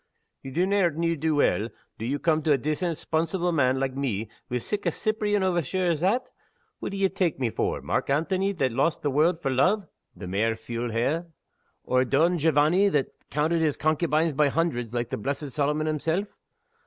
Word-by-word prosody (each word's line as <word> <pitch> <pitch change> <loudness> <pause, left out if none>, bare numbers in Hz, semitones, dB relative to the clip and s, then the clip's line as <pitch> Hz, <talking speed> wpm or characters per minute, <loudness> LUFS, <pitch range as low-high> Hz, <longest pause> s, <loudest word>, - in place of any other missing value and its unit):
"Ye 135 - -7
donnert 180 +1 +2
ne'er 165 +1 0
do 160 0 0
weel, 115 -6 +2 0.3
do 110 - -4
you 140 +3 0
come 155 +1 +1
to 155 - +1
a 140 - +5
decent, 155 +5 -1
'sponsible 170 +2 -1
man 130 -5 +2
like 135 -1 -1
me, 115 -6 -2 0.2
wi' 125 - 0
sic 195 - -3
a - - +3
Cyprian 210 +1 0
overture 185 0 0
as 160 - -1
that? 205 +10 0 0.5
What - - -4
d'ye 195 0 +1
tak' 185 -3 -1
me 125 -4 -1
for? - - -2
Mark - - -1
Antony 185 +7 +1
that 135 -8 0
lost 155 +7 0
the 145 - +1
world 160 +5 +2
for 135 -5 -1
love 185 +9 +2 0.3
(the 100 - -8
mair 105 +5 0
fule 115 +1 -4
he!)? 120 +8 +1 0.6
or 130 0 +2
Don 160 +7 +2
Jovanny 160 +6 +4
that 145 -7 +1 0.2
counted 160 +3 +1
his 155 -3 +1
concubines 155 0 +1
by 150 +1 +3
hundreds, 135 -7 -1
like 120 -1 -2
the - - -1
blessed 140 +5 -3
Solomon 150 +3 0
himself? 160 +6 -1
155 Hz, 190 wpm, -26 LUFS, 135-175 Hz, 0.6 s, a